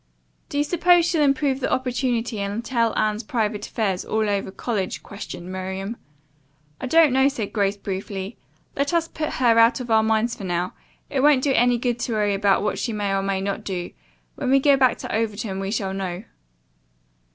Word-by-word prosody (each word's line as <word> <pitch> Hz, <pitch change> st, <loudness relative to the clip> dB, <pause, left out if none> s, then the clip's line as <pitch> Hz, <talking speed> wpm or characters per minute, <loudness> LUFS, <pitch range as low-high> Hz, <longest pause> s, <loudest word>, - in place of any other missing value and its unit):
"Do -, -, -4 dB
you 290 Hz, -, +3 dB
suppose 350 Hz, +2 st, +4 dB
she'll 335 Hz, -2 st, +1 dB
improve 275 Hz, -1 st, +2 dB
the -, -, -2 dB
opportunity 245 Hz, -3 st, -1 dB
and 200 Hz, +4 st, -3 dB
tell 230 Hz, -2 st, 0 dB
Anne's 215 Hz, 0 st, +1 dB
private 215 Hz, -2 st, -2 dB
affairs 195 Hz, -5 st, -1 dB
all 220 Hz, 0 st, 0 dB
over 200 Hz, -1 st, -1 dB
college?" 195 Hz, -1 st, -3 dB
questioned 185 Hz, -3 st, -8 dB
Miriam. 190 Hz, +3 st, -4 dB, 0.8 s
"I -, -, -4 dB
don't 320 Hz, -1 st, +5 dB
know," 265 Hz, +1 st, +4 dB
said 240 Hz, -8 st, -3 dB
Grace 200 Hz, -1 st, +1 dB
briefly. 195 Hz, +1 st, -5 dB, 0.4 s
"Let 280 Hz, +3 st, 0 dB
us 330 Hz, -1 st, +2 dB
put 310 Hz, -2 st, -4 dB
her 235 Hz, -3 st, +4 dB
out 230 Hz, +3 st, +5 dB
of 245 Hz, -2 st, -5 dB
our 220 Hz, 0 st, +5 dB
minds 220 Hz, +2 st, +1 dB
for 210 Hz, -, -8 dB
now. 175 Hz, 0 st, -2 dB, 0.4 s
It 275 Hz, -, 0 dB
won't 275 Hz, -1 st, +4 dB
do 280 Hz, -, +2 dB
any 245 Hz, 0 st, +3 dB
good 240 Hz, 0 st, -1 dB
to 235 Hz, -, -2 dB
worry 210 Hz, -2 st, +1 dB
about 195 Hz, -1 st, +2 dB
what 210 Hz, -, -1 dB
she 235 Hz, -, -2 dB
may 205 Hz, -2 st, -1 dB
or 195 Hz, -, +1 dB
may 195 Hz, -1 st, -1 dB
not 200 Hz, 0 st, -3 dB
do. 180 Hz, -3 st, -4 dB, 0.4 s
When -, -, -3 dB
we 270 Hz, +1 st, +5 dB
go 280 Hz, +1 st, +5 dB
back 260 Hz, -2 st, +3 dB
to -, -, -4 dB
Overton 215 Hz, -3 st, -2 dB
we 195 Hz, 0 st, -3 dB
shall 195 Hz, -2 st, -2 dB
know." 190 Hz, -1 st, -4 dB
220 Hz, 195 wpm, -23 LUFS, 195-260 Hz, 0.8 s, don't